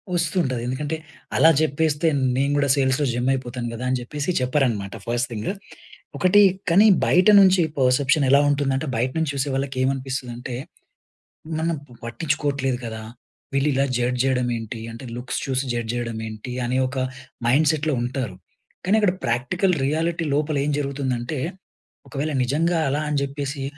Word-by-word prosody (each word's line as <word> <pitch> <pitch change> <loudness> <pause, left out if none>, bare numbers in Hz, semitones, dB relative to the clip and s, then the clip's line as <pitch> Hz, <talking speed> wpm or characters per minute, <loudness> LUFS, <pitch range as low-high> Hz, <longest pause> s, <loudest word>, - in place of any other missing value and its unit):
వస్తుంటది. 160 -7 0
ఎందుకంటే 145 +5 -2 0.4
అలా 160 - +7
చెప్పేస్తే 155 +1 +1 0.3
నేను 140 +1 +1
కూడా 140 -1 +1
సేల్స్‌లో 135 +1 +1
జెమ్ 120 +2 0
అయిపోతాను 125 -2 -4
కదా! 115 - -6
అని 130 - +1
చెప్పేసి 145 +6 -4
చెప్పరన్నమాట 125 -7 0
ఫస్ట్ 120 +1 0
థింగ్. 110 -2 -3 0.7
ఒకటి 185 +3 +5 0.3
కానీ, 195 +6 +6 0.2
బయట 180 +3 +4
నుంచి 185 -2 +5 0.2
పర్సెప్షన్ 135 +3 +3
ఎలా 140 +1 +6
ఉంటుందంటే, 140 0 0
బయట 125 +3 0
నుంచి 160 -2 0
చూసే 140 +1 -1
వాళ్ళకి 135 0 -3
ఏమనిపిస్తుందంటే, 130 -2 -3 1.0
మనం 165 +1 0 0.3
పట్టించుకోవట్లేదు 140 -1 -1
కదా! 110 -1 -6 0.5
వీళ్ళు 140 +2 +2
ఇలా 135 +1 +2
జడ్జ్ 125 +1 0
చేయడం 125 -2 +1
ఏంటి? 115 +1 -6
అంటే 115 +3 -10
లుక్స్ 125 0 -3
చూసి 130 -1 0
జడ్జ్ 115 -1 -2
చేయడం 115 -2 -3
ఏంటి? 110 +3 -8
అనే 125 +2 0
ఒక 130 +1 -6 0.5
మైండ్‌సెట్‌లో 150 +3 +2
ఉంటారు. 120 -5 -3 0.5
కానీ 195 - +3
అక్కడ 200 -4 +3
ప్రాక్టికల్ 170 +11 +1
రియాలిటీ 165 +3 0
లోపల 150 +1 0
ఏం 150 - 0
జరుగుతుందంటే, 135 -1 -2 0.7
ఒకవేళ 150 +2 -3
నిజంగా 165 +7 +1
అలా 145 +3 0
అని 145 - +1
చెప్పేసి, 140 0 -4
135 Hz, 145 wpm, -23 LUFS, 125-150 Hz, 1.0 s, అలా